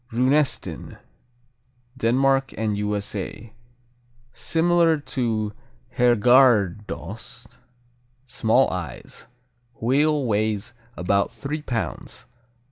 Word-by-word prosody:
Runesten 130 Hz, +5 st, 0 dB, 1.0 s
Denmark 135 Hz, +2 st, +1 dB
and 110 Hz, -2 st, -1 dB
U.S.A. 105 Hz, +1 st, -4 dB, 0.8 s
Similar 165 Hz, -1 st, +2 dB
to 115 Hz, -7 st, -2 dB, 0.4 s
Herrgårdsost. 115 Hz, -, +2 dB, 0.7 s
Small 120 Hz, +1 st, +2 dB
eyes. 85 Hz, -, -7 dB, 0.5 s
"Wheel" 145 Hz, +4 st, +2 dB
weighs 110 Hz, -1 st, -1 dB, 0.2 s
about 100 Hz, +3 st, +1 dB
three 150 Hz, +2 st, -5 dB
pounds. 120 Hz, -6 st, -5 dB
120 Hz, 65 wpm, -23 LUFS, 105-135 Hz, 1.0 s, Similar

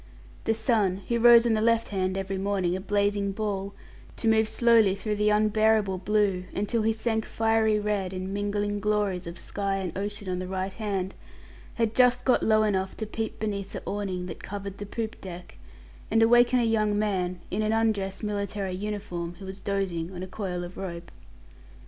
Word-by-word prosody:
The 225 Hz, -, +2 dB
sun 215 Hz, -4 st, +1 dB
who 235 Hz, -1 st, +1 dB
rose 235 Hz, 0 st, +8 dB
on 235 Hz, -, +3 dB
the 215 Hz, -, +1 dB
left 230 Hz, 0 st, +2 dB
hand 190 Hz, -1 st, -1 dB
every 195 Hz, 0 st, -3 dB
morning 190 Hz, -3 st, 0 dB
a 190 Hz, -, -4 dB
blazing 200 Hz, 0 st, 0 dB
ball, 200 Hz, -1 st, -3 dB, 0.4 s
to 230 Hz, -, -1 dB
move 220 Hz, 0 st, +4 dB
slowly 230 Hz, -5 st, +4 dB
through 210 Hz, +1 st, -2 dB
the 210 Hz, 0 st, +2 dB
unbearable 215 Hz, -2 st, +3 dB
blue, 195 Hz, -2 st, +1 dB
until 210 Hz, +3 st, 0 dB
he 220 Hz, +1 st, +2 dB
sank 220 Hz, 0 st, -1 dB
fiery 225 Hz, -1 st, +2 dB
red 205 Hz, -3 st, -1 dB
in 185 Hz, +1 st, -4 dB
mingling 205 Hz, 0 st, -1 dB
glories 205 Hz, -4 st, 0 dB
of 170 Hz, +1 st, -7 dB
sky 200 Hz, +2 st, -2 dB
and 190 Hz, -3 st, -3 dB
ocean 205 Hz, 0 st, -4 dB
on 180 Hz, -1 st, -2 dB
the 185 Hz, -, -4 dB
right 190 Hz, +1 st, -3 dB
hand 195 Hz, -4 st, -3 dB, 0.6 s
had 230 Hz, -2 st, 0 dB
just 250 Hz, 0 st, +4 dB
got 255 Hz, -, +4 dB
low 215 Hz, 0 st, +4 dB
enough 190 Hz, -3 st, -1 dB
to 220 Hz, -, -3 dB
peep 220 Hz, +1 st, -4 dB
beneath 200 Hz, -2 st, -3 dB
the -, -, -5 dB
awning 190 Hz, -3 st, -3 dB
that 175 Hz, -, -7 dB
covered 200 Hz, -1 st, -6 dB
the 205 Hz, -, -6 dB
poop 225 Hz, +2 st, -5 dB
deck, 180 Hz, -2 st, -9 dB, 0.5 s
and 225 Hz, 0 st, +4 dB
awaken 240 Hz, +2 st, +5 dB
a 245 Hz, -, +3 dB
young 215 Hz, -2 st, +2 dB
man, 185 Hz, -4 st, -1 dB
in -, -, 0 dB
an 215 Hz, 0 st, +1 dB
undress 215 Hz, -3 st, 0 dB
military 200 Hz, -2 st, -2 dB
uniform, 185 Hz, -4 st, -4 dB
who 195 Hz, -, -10 dB
was 190 Hz, +1 st, -7 dB
dozing 190 Hz, -4 st, -2 dB
on 180 Hz, -, -5 dB
a -, -, -5 dB
coil 185 Hz, -2 st, -4 dB
of 175 Hz, +1 st, -9 dB
rope. 170 Hz, -3 st, -6 dB
205 Hz, 190 wpm, -27 LUFS, 190-220 Hz, 0.6 s, rose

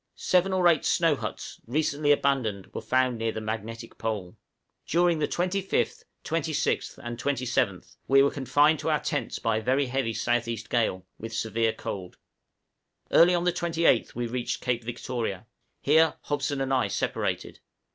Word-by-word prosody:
Seven 185 Hz, +1 st, +2 dB
or 185 Hz, -2 st, +3 dB
eight 165 Hz, -4 st, +4 dB
snow 165 Hz, -3 st, +3 dB
huts, -, -, -6 dB
recently 145 Hz, +2 st, +1 dB
abandoned, 130 Hz, -9 st, 0 dB
were -, -, -4 dB
found 125 Hz, +1 st, +1 dB
near 115 Hz, 0 st, 0 dB
the 110 Hz, -, -5 dB
magnetic 115 Hz, +1 st, -6 dB
pole. 105 Hz, -5 st, -3 dB, 0.5 s
During 170 Hz, 0 st, +2 dB
the 150 Hz, -, +1 dB
25th, 185 Hz, +2 st, -1 dB, 0.2 s
26th, 160 Hz, -2 st, -1 dB
and 120 Hz, 0 st, -5 dB
27th, 125 Hz, -8 st, -1 dB
we 135 Hz, 0 st, +6 dB
were 140 Hz, -, +3 dB
confined 145 Hz, +3 st, +3 dB
to -, -, -2 dB
our -, -, +2 dB
tents -, -, -2 dB
by 115 Hz, -1 st, 0 dB
a -, -, -2 dB
very 130 Hz, +5 st, +2 dB
heavy 130 Hz, -2 st, -1 dB
south 120 Hz, +2 st, 0 dB
east 110 Hz, -1 st, -5 dB
gale, 100 Hz, -6 st, 0 dB
with 115 Hz, 0 st, -6 dB
severe 115 Hz, 0 st, 0 dB
cold. 90 Hz, -3 st, -6 dB, 0.9 s
Early 175 Hz, +2 st, +6 dB
on 175 Hz, -, 0 dB
the 180 Hz, -1 st, +2 dB
28th 170 Hz, -7 st, +1 dB
we 120 Hz, +1 st, -2 dB
reached 120 Hz, +1 st, -3 dB
Cape 120 Hz, -2 st, 0 dB
Victoria; 115 Hz, -3 st, -4 dB, 0.4 s
here 160 Hz, +2 st, +4 dB
Hobson 145 Hz, -1 st, -2 dB
and 135 Hz, 0 st, 0 dB
I 130 Hz, -, +2 dB
separated. -, -, -2 dB
130 Hz, 160 wpm, -27 LUFS, 115-155 Hz, 0.9 s, we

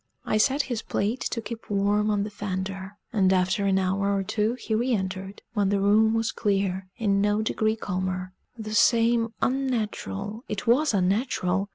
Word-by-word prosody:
I 215 Hz, -, +1 dB
set 270 Hz, +7 st, +3 dB
his 240 Hz, -4 st, -3 dB
plate 220 Hz, +5 st, -1 dB
to 230 Hz, -, -3 dB
keep 230 Hz, 0 st, -8 dB
warm 205 Hz, +1 st, +2 dB
on 205 Hz, -1 st, +1 dB
the 210 Hz, -, -5 dB
fender; 195 Hz, 0 st, -5 dB, 0.2 s
and 190 Hz, -4 st, +3 dB
after 185 Hz, +2 st, +2 dB
an 190 Hz, -1 st, +3 dB
hour 190 Hz, +1 st, +1 dB
or 195 Hz, -, -1 dB
two 215 Hz, +4 st, 0 dB
he 235 Hz, -2 st, -4 dB
re 240 Hz, +3 st, +1 dB
entered, 190 Hz, -1 st, -4 dB
when 205 Hz, -3 st, +1 dB
the 200 Hz, 0 st, +1 dB
room 215 Hz, +3 st, +4 dB
was 225 Hz, 0 st, 0 dB
clear, 195 Hz, -2 st, -1 dB
in 200 Hz, -4 st, +1 dB
no 210 Hz, +1 st, +2 dB
degree 220 Hz, 0 st, 0 dB
calmer: 185 Hz, -3 st, -3 dB, 0.2 s
the 215 Hz, -1 st, -6 dB
same 230 Hz, +1 st, +3 dB
unnatural 225 Hz, -4 st, -2 dB
it 205 Hz, -2 st, -4 dB
was 250 Hz, +2 st, +3 dB
unnatural! 195 Hz, -1 st, 0 dB
205 Hz, 175 wpm, -26 LUFS, 195-225 Hz, 0.2 s, room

